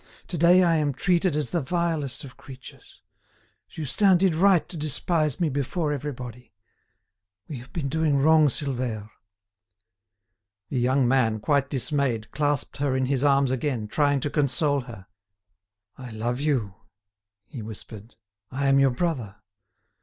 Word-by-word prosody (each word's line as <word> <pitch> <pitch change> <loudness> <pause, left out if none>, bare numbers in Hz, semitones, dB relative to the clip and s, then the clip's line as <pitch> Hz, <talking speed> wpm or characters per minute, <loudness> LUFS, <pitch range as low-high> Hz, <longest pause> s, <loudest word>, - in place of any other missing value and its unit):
To 175 - -3
day 175 +3 +6
I 165 -2 +3
am 145 -2 0
treated 180 +1 +1
as 150 -1 -2
the 170 - 0
vilest 155 -3 -2
of 135 -3 -11
creatures. 130 -1 -14 0.7
Justin 180 +6 +2
did 185 -1 +2
right 185 +1 +3
to - - -7
despise 155 0 -1
me 170 - +2
before 150 +3 -2
everybody. 125 -5 -7 0.9
We 140 - -6
have 125 +2 -14
been 155 -5 -3
doing 155 0 +1
wrong, 155 +2 +5
Silvère." 125 -6 -3 1.6
The 130 - -1
young 130 +1 +2
man, 120 -4 +2
quite 140 +4 +1
dismayed, 130 -5 -1
clasped 145 -1 -1
her 140 -2 0
in 130 - +1
his 135 0 0
arms 140 -2 +3
again, 130 -4 -2
trying 145 +3 +1
to 145 - -2
console 145 0 +1
her. 95 -5 -10 0.9
"I 125 -1 -8
love 120 +3 -3
you," 135 -10 0 0.7
he 130 -7 -9
whispered, 110 0 -10 0.3
"I 140 +2 -3
am 135 0 +4
your 135 0 +5
brother. 125 - -2
140 Hz, 145 wpm, -25 LUFS, 125-155 Hz, 1.6 s, day